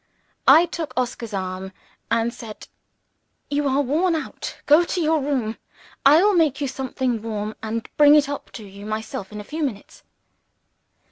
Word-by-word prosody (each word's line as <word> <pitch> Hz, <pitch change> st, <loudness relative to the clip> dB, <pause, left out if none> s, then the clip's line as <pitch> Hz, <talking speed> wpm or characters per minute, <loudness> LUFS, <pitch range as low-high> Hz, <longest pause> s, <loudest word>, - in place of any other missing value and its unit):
I 335 Hz, -, +8 dB
took 320 Hz, -6 st, -6 dB
Oscar's 240 Hz, -2 st, -2 dB
arm, 190 Hz, -1 st, -4 dB, 0.4 s
and 230 Hz, +1 st, +1 dB
said, 220 Hz, -2 st, -10 dB, 0.8 s
"You 290 Hz, 0 st, +1 dB
are 270 Hz, +1 st, +2 dB
worn 325 Hz, +6 st, +1 dB
out. 315 Hz, -, -5 dB
Go 300 Hz, +4 st, +6 dB
to 355 Hz, -, -3 dB
your 315 Hz, -2 st, +2 dB
room. 260 Hz, -6 st, -1 dB, 0.5 s
I 300 Hz, +6 st, +7 dB
will 415 Hz, 0 st, +4 dB
make 310 Hz, -6 st, +2 dB
you 285 Hz, -, -1 dB
something 255 Hz, -3 st, -2 dB
warm 215 Hz, -1 st, -4 dB
and 225 Hz, +1 st, -4 dB
bring 295 Hz, 0 st, +8 dB
it 295 Hz, -2 st, +4 dB
up 285 Hz, 0 st, -6 dB
to 225 Hz, -, -8 dB
you 200 Hz, +1 st, -11 dB
myself 215 Hz, -2 st, -5 dB
in 210 Hz, -, -7 dB
a -, -, -6 dB
few 310 Hz, +9 st, -6 dB
minutes." 240 Hz, -9 st, -4 dB
260 Hz, 165 wpm, -23 LUFS, 220-300 Hz, 0.8 s, I